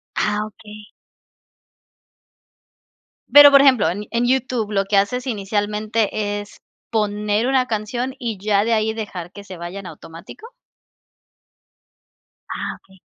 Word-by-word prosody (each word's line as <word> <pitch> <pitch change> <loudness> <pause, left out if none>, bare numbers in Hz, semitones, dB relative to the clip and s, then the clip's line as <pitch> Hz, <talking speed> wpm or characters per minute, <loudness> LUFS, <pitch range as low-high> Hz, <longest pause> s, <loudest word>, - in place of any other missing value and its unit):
Ah, 210 0 0
okey. 210 0 -13 2.5
Pero, 290 0 +10
por 275 - +7
ejemplo, 255 - +4
en 205 +4 -4
en 235 +1 0
YouTube 250 -4 0
lo 195 -1 +1
que 200 0 +1
haces 245 +6 0
inicialmente, 210 0 -1
¿es 205 0 -12 0.3
poner 210 +1 0
una 260 -1 +2
canción 240 +4 -3
y 230 -5 -4
ya 205 0 +1
de 230 +1 0
ahí 220 0 +1
dejar 195 -6 -6
que 205 - -11
se 190 -2 -10
vaya 175 +3 -7
en 195 - -9
automático? 165 - -12 2.0
Ah, - - -4
okey. 190 -1 -23
210 Hz, 130 wpm, -20 LUFS, 200-235 Hz, 2.5 s, Pero